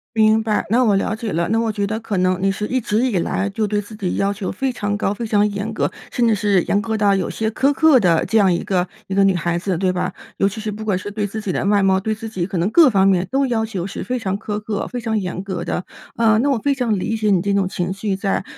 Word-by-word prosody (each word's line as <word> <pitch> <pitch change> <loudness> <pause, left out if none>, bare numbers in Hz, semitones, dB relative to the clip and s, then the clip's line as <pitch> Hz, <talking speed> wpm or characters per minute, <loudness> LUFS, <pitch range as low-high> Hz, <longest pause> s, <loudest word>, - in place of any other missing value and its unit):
明 220 0 +4
白， 215 -2 0
那 240 +4 +3
我 210 -5 +3
了 200 +2 -1
解 220 -2 -4
了。 170 +1 0
那 225 - +2
我 225 -1 0
觉 205 -1 -2
得， 215 +2 -2
可 220 -3 -3
能 185 0 +2
你 195 - +3
是 210 +2 -3
一 255 +2 0
直 220 +3 +1
以 220 -7 0
来 190 +3 -1
就 215 +2 -1
对 210 0 0
自 205 +2 -11
己 195 -4 -2
要 200 +1 +1
求 200 -2 -4
非 265 +7 -2
常 205 -3 -2
高、 205 -1 0
非 230 +3 -5
常 210 -1 +2
严 200 +2 -4
格， - - 0 0.2
甚 240 -1 +1
至 225 - +3
是 205 -3 +2
严 200 - +1
格 220 0 -2
到 200 -2 +3
有 190 - -1
些 220 0 -2
苛 265 +5 +2
刻 310 -1 +5
的 175 -8 +3
这 225 - +1
样 195 -4 +4
一 170 - -1
个 180 -2 +1 0.2
一 190 - -3
个 200 - +4
女 195 -1 +4
孩 170 -1 -1
子， 180 0 -2
对 185 +1 +1
吧？ 180 0 -2 0.2
尤 195 - +2
其 210 +3 -8
是 215 0 -4
不 210 +1 -6
管 200 -4 0
是 205 - -6
对 210 0 -2
自 205 +2 -5
己 205 -4 -3
的 - - -1
外 200 0 +3
貌、 190 -1 +3
对 215 +3 -1
自 220 +1 -7
己 190 -6 -3
可 190 0 -4
能 175 +4 +1
各 325 -1 +7
方 195 -4 +3
面 185 -2 +3
都 270 +1 +2
要 225 -3 0
求 195 -5 -4
是 200 - -6
非 250 0 -2
常 195 -3 -2
苛 210 0 -4
刻、 210 -1 -3
非 245 - -4
常 220 -2 -1
严 185 -2 -3
格 190 -3 -4
的。 180 - -3 0.3
呃， 220 -2 +4
那 275 +5 +2
我 275 - +2
非 280 +5 0
常 235 -6 0
理 225 - -2
解 215 -1 +1
你 185 -3 +3
这 200 +2 0
种 195 -2 +1
情 180 0 -2
绪 195 0 -2
在。 195 -1 -1
205 Hz, 325 characters per minute, -20 LUFS, 190-220 Hz, 0.3 s, 各